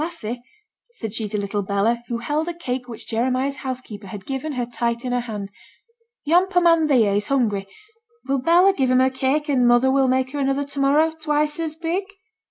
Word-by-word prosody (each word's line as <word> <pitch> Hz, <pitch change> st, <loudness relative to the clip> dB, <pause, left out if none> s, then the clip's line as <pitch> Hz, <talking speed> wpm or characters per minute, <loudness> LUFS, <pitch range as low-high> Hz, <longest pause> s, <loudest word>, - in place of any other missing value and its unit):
'Lassie,' 250 Hz, -9 st, -5 dB, 0.5 s
said 220 Hz, -, -6 dB
she 220 Hz, -2 st, -3 dB
to 210 Hz, -, -2 dB
little 205 Hz, +1 st, -2 dB
Bella, 200 Hz, +4 st, 0 dB
who 235 Hz, -, -2 dB
held 295 Hz, +7 st, -2 dB
a 345 Hz, -, -3 dB
cake 255 Hz, -6 st, -4 dB
which 235 Hz, -3 st, -8 dB
Jeremiah's 255 Hz, +4 st, 0 dB
housekeeper 250 Hz, -6 st, -6 dB
had 195 Hz, 0 st, -8 dB
given 275 Hz, +3 st, -4 dB
her 250 Hz, -2 st, -2 dB
tight 235 Hz, +1 st, -2 dB
in 250 Hz, -, -2 dB
her 245 Hz, -, +1 dB
hand, 210 Hz, -5 st, -6 dB, 0.7 s
'yon 350 Hz, +5 st, +4 dB
poor 360 Hz, -2 st, +2 dB
man 330 Hz, -2 st, +4 dB
theere 230 Hz, -8 st, +3 dB
is 205 Hz, -, -2 dB
hungry; 215 Hz, -8 st, 0 dB, 0.6 s
will 275 Hz, 0 st, +1 dB
Bella 350 Hz, +8 st, +5 dB
give 265 Hz, -8 st, 0 dB
him 255 Hz, -, +4 dB
her 260 Hz, +1 st, +4 dB
cake, 270 Hz, +4 st, 0 dB
and 255 Hz, -4 st, +3 dB
mother 240 Hz, +2 st, +4 dB
will 270 Hz, 0 st, +3 dB
make 260 Hz, 0 st, +1 dB
her 290 Hz, -, -4 dB
another 275 Hz, +1 st, +1 dB
to 280 Hz, 0 st, -7 dB
morrow 295 Hz, +4 st, +3 dB
twice 300 Hz, -1 st, -1 dB
as 320 Hz, -2 st, -2 dB
big?' 340 Hz, +4 st, -2 dB
260 Hz, 205 wpm, -22 LUFS, 235-300 Hz, 0.7 s, Bella